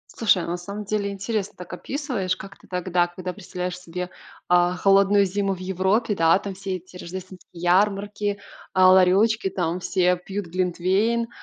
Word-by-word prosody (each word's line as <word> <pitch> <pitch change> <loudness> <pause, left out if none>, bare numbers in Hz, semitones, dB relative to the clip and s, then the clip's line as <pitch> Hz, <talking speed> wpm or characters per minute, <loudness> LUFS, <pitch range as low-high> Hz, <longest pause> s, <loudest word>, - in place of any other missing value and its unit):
Слушай, 205 -6 +3
а - - -6
на 175 +1 -2
самом 200 +4 -7
деле 205 -1 -1
интересно 200 +1 -3
так 180 -1 -9
описываешь, 240 -6 -2
как 195 0 -10
ты - - -20
тогда, 180 -1 0
когда 180 +1 -6
представляешь 180 0 -5
себе, 180 +1 -6 0.4
а, 175 0 +3
холодную 195 +1 +4
зиму 195 0 -1
в - - -12
Европе, 190 +4 0
да, 165 +1 +4
там 200 -1 -6
все 190 0 -4
эти 185 0 -10
рождественские 185 +1 -9
ярмарки, 205 +2 +1 0.3
а, 185 0 +6
ларёчки, 190 +3 +4
там 175 -1 -2
все 180 0 +2
пьют 190 +2 -5
глинтвейн 185 +6 0
185 Hz, 165 wpm, -24 LUFS, 180-200 Hz, 0.4 s, а